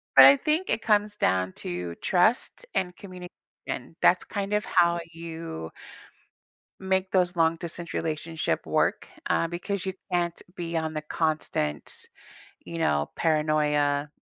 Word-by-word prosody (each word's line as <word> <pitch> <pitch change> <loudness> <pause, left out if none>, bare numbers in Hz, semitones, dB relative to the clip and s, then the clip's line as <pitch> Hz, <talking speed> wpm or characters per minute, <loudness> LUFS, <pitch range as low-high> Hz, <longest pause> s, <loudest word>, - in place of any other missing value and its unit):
But 135 - +11
I 140 +1 +9
think 315 +5 0
it - - +1
comes 210 -1 +2
down 95 - +1
to 90 -1 -4
trust 220 - +1
and 180 -1 0
communication, 180 -2 -9
that's - - +4
kind 200 0 -3
of 210 +1 +1
how 170 -1 +3
you 165 - -7 1.1
make 190 0 0
those 180 -1 +2
long 165 0 +3
distance 170 0 -7
relationship 160 0 -2
work, - - +1 0.2
uh, 165 - +2
because 185 +3 -3
you 190 - -2 0.2
can't 175 -1 0
be 170 -1 -3
on 160 -1 -2
the 155 - -3
constant, 155 - -2 0.6
you 170 - -6
know, 75 - +1
paranoia, 150 -2 +1
165 Hz, 135 wpm, -27 LUFS, 150-185 Hz, 1.1 s, But